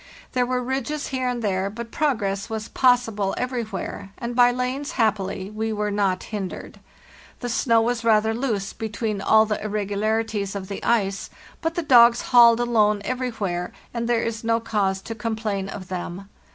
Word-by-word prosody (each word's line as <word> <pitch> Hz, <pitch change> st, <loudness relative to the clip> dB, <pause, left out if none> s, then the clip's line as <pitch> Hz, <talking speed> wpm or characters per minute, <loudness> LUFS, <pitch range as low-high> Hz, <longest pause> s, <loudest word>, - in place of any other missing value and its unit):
There 250 Hz, -1 st, +1 dB
were 250 Hz, 0 st, -1 dB
ridges 270 Hz, +3 st, -2 dB
here 260 Hz, -1 st, -1 dB
and 240 Hz, -2 st, -3 dB
there, 195 Hz, -1 st, 0 dB
but 230 Hz, +2 st, -8 dB
progress 205 Hz, -10 st, -1 dB
was 220 Hz, 0 st, -4 dB
possible 230 Hz, -6 st, +2 dB
every 250 Hz, -1 st, -1 dB
where, 200 Hz, -1 st, -6 dB
and 240 Hz, -1 st, -4 dB
by 245 Hz, 0 st, +6 dB
lanes, 255 Hz, +5 st, -2 dB
happily, 200 Hz, -4 st, 0 dB
we 220 Hz, +1 st, -2 dB
were 210 Hz, -1 st, -1 dB
not 195 Hz, -2 st, 0 dB
hindered. 200 Hz, -4 st, -6 dB, 0.6 s
The 245 Hz, -, -3 dB
snow 230 Hz, -1 st, +3 dB
was 235 Hz, 0 st, -1 dB
rather 220 Hz, -1 st, +3 dB
loose 225 Hz, -5 st, -2 dB
between 215 Hz, -2 st, -3 dB
all 220 Hz, +2 st, +5 dB
the 210 Hz, -1 st, -3 dB
irregularities 210 Hz, 0 st, -1 dB
of 190 Hz, -1 st, -5 dB
the 200 Hz, -, -6 dB
ice; 200 Hz, -4 st, 0 dB, 0.3 s
but 325 Hz, 0 st, -1 dB
the 345 Hz, -, -1 dB
dogs 240 Hz, -4 st, +6 dB
hauled 235 Hz, -1 st, +8 dB
alone 215 Hz, -4 st, +2 dB
everywhere, 215 Hz, -9 st, -2 dB, 0.2 s
and 235 Hz, -1 st, -2 dB
there 235 Hz, -1 st, +2 dB
is 230 Hz, 0 st, -3 dB
no 230 Hz, 0 st, +2 dB
cause 200 Hz, -4 st, -1 dB
to 225 Hz, -, -5 dB
complain 215 Hz, -3 st, -3 dB
of 190 Hz, -2 st, -8 dB
them. 185 Hz, +1 st, -5 dB
220 Hz, 170 wpm, -23 LUFS, 200-240 Hz, 0.6 s, hauled